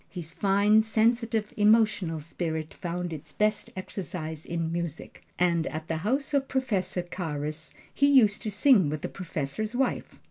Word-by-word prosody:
His 170 -3 -6
fine, 200 +4 +4
sensitive, 220 0 +1
emotional 210 -6 +3
spirit 160 0 -4
found 175 0 -4
its 150 - -8
best 210 0 0
exercise 170 -4 -5
in 165 -1 -2
music; 170 -2 -5 0.2
and 170 -2 +2
at 155 +1 -6
the 165 - 0
house 265 - -1
of 275 -1 +2
Professor 210 -9 -1
Carus 155 -3 -5 0.2
he 280 - +3
used 240 -8 +5
to 220 - -3
sing 205 - +4
with 150 0 -4
the - - -2
professor's 180 - -4
wife. 265 0 -1
185 Hz, 150 wpm, -27 LUFS, 160-220 Hz, 0.2 s, used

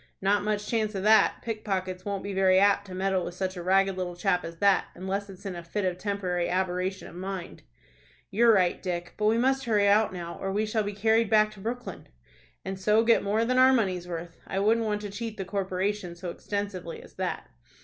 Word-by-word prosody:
"Not 200 +2 +2
much 210 0 -1
chance 215 -1 -1
of 190 - -3
that. 220 +1 +4
Pickpockets 190 -5 -3
won't 200 -1 -3
be 200 - -4
very 190 -1 +4
apt 200 +1 +3
to 185 - -8
meddle 190 -1 0
with 175 - -6
such 185 0 -3
a 175 - -5
ragged 190 +1 +2
little 180 -1 -3
chap 180 0 +1
as 165 0 -7
that, 200 +2 +3
unless 195 +2 -3
it's 195 +1 -12
in 190 -2 -4
a 170 - -7
fit 195 +4 -3
of 180 -1 -1
temporary 185 -4 -1
aberration 185 +1 -1
of - - -12
mind." 185 -1 -6 0.7
"You're 230 +3 +5
right, 185 -5 +2
Dick. 175 -2 -4
But 210 - 0
we 220 +1 +3
must 265 +2 +1
hurry 210 -3 +3
out 210 +2 +4
now, 170 -2 -7
or 195 - -2
we 210 +2 0
shall 215 +1 0
be 205 0 -3
carried 220 +2 +2
back 215 -1 +4
to 210 - -14
Brooklyn." 240 +5 -6 0.6
"And 190 0 -4
so 210 +3 +3
get 230 0 +4
more 215 +3 +1
than 255 +2 +2
our 260 +1 +7
money's 185 -7 0
worth. 170 -1 -6
I 195 - -3
wouldn't 220 +3 +2
want 210 -1 -1
to 205 -1 -6
cheat 225 +1 -5
the 195 - -4
corporation 190 -1 -2
so 175 0 -6
extensively 200 -4 -5
as - - -16
that." - - -3
195 Hz, 220 wpm, -27 LUFS, 185-215 Hz, 0.7 s, our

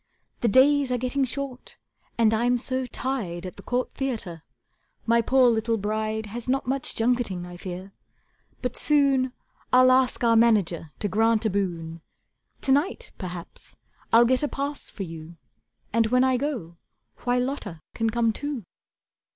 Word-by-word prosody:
The 235 - +1
days 270 +4 +4
are 250 - +1
getting 255 +3 0
short, 260 0 -6 0.4
and 225 -1 +4
I'm 240 +3 +2
so 260 +1 -1
tied 215 -11 -3
At 185 - -7
the - - -11
Court 250 +1 -2
Theatre 225 - -4 0.6
my 235 0 +4
poor 255 +2 +4
little 225 0 0
bride 215 +1 -2
Has 230 +4 -6
not 270 +1 +1
much 265 +2 -1
junketing 225 -6 0
I 175 0 -9
fear, 185 +2 -7 0.7
but 250 0 -2
soon 275 -3 +3 0.4
I'll 255 0 +6
ask 255 -1 +2
our 230 -1 +4
manager 205 -8 +3
to 210 - +1
grant 225 +2 +2
a 215 - +2
boon. 170 -4 -3 0.6
To 270 - 0
night, 290 +7 +1
perhaps, 175 -2 -8 0.4
I'll 235 +1 +7
get 255 +1 +2
a 295 - +1
pass 280 +1 -4
for 200 - -6
you, 165 -1 -9 0.6
And 230 0 +3
when 250 +2 +3
I 260 -1 +3
go, 240 - -3 0.4
why 245 0 0
Lotta 250 - -3
can 225 -1 0
come 230 0 +1
too. 285 -2 -4
235 Hz, 160 wpm, -25 LUFS, 200-260 Hz, 0.7 s, I'll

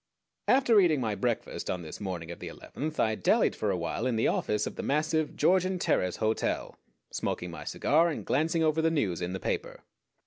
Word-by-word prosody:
After 255 -5 +5
eating 165 -7 +4
my 110 -4 -1
breakfast 120 +2 -2
on 90 -1 -2
this 80 - -8
morning 85 -4 -4
of 85 - -8
the - - -7
eleventh 155 +2 -6
I 110 - +3
dallied - - +2
for - - -1
awhile 120 - -1
in 125 - 0
the 110 - +2
office 105 0 0
of - - -5
the - - -4
massive 155 +1 0
Georgian 185 0 +2
Terrace 90 - +1
Hotel, 110 0 -1 0.4
smoking 90 0 -3
my 75 -3 -8
cigar, 165 +4 +2
and 160 - -4
glancing 160 +4 +1
over 155 0 +2
the 165 - +3
news 105 - 0
in 90 +1 -2
the 95 - -3
paper. - - -3
130 Hz, 200 wpm, -29 LUFS, -, 0.4 s, After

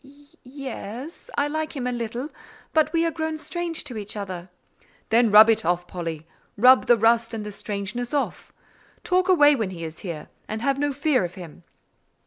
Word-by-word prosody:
Y—e—s, 280 - -9
I 285 - +2
like 310 +1 -3
him 260 -3 -3
a 250 - 0
little; 240 +3 -4 0.4
but 315 -1 +3
we 330 0 +2
are 330 - +1
grown 315 -1 -3
strange 340 +1 -4
to 250 -6 -6
each 210 0 -6
other." 185 -3 -6 0.6
"Then 230 +1 +4
rub 215 +2 +9
it 225 -1 +3
off, 175 0 0
Polly; 165 -3 -5 0.3
rub 255 +4 +6
the 240 - +6
rust 230 +1 +2
and 215 -1 -5
the 210 - -5
strangeness 205 +4 -4
off. 290 -2 -2 0.5
Talk 365 +1 +1
away 295 -5 +6
when 220 -7 -2
he 170 -3 -7
is 160 0 -7
here, 170 -5 -7 0.2
and 220 +1 -4
have 275 0 +1
no 290 0 +1
fear 280 -4 +1
of 175 0 -5
him?" 175 -5 -10
240 Hz, 185 wpm, -24 LUFS, 205-290 Hz, 0.6 s, rub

